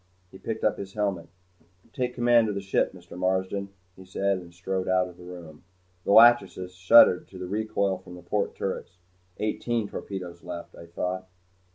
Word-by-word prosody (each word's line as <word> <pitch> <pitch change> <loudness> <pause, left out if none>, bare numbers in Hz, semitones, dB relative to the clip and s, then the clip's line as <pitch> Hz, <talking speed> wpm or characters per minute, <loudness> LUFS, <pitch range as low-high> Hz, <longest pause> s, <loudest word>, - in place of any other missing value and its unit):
He 95 - -13
picked 110 -1 -5
up 110 - +1
his 95 -1 -7
helmet. 100 -5 -2 0.6
"Take 125 -1 -2
command 120 -2 +4
of 105 - -3
the - - -1
ship, 95 0 +1
Mr. 90 -2 -13
Marsden," 95 +2 -1 0.3
he 95 - -13
said, 95 +1 -1
and 85 -1 -13
strode 95 +2 -3
out 95 0 +2
of 90 - -12
the 90 - -14
room. 85 -4 -11 0.4
The - - +1
"Lachesis" 100 -5 +5
shuddered 95 0 +6
to 95 - -12
the 90 - -5
recoil 100 -2 -1
from 90 -1 -12
the 90 - -12
port 105 -1 -1
turrets. 95 -2 -4 0.4
Eighteen 110 +1 -1
torpedoes 90 -4 -7
left, 85 -1 -7
I 85 - -12
thought. 90 +2 -4
95 Hz, 180 wpm, -27 LUFS, 90-105 Hz, 0.6 s, shuddered